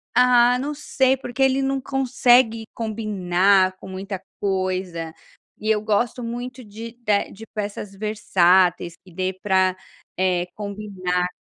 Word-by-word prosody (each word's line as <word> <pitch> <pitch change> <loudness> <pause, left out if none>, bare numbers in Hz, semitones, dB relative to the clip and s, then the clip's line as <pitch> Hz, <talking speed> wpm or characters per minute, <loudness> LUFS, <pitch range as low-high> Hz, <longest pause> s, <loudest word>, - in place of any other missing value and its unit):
Ah, 245 0 +5
não 290 +3 -3
sei, 265 -2 +1
porque 260 0 -6
ele 265 0 +3
não 270 0 0
consegue 250 -4 +3
combinar 195 -4 +1
com - - -12
muita 190 0 -6 0.2
coisa. 185 -4 -2 0.5
E 215 - -3
eu 215 -1 +3
gosto 220 +3 0
muito 245 +2 -6
de 225 +2 -9
da 205 -2 +2
de 225 +3 -11
peças 205 -1 -5
versáteis 185 -4 +2
que 185 - -17
dê 185 +2 -2
para, 190 -1 +1 0.4
eh, 180 -1 +1
combinar 195 -4 -2
210 Hz, 130 wpm, -22 LUFS, 185-240 Hz, 0.5 s, Ah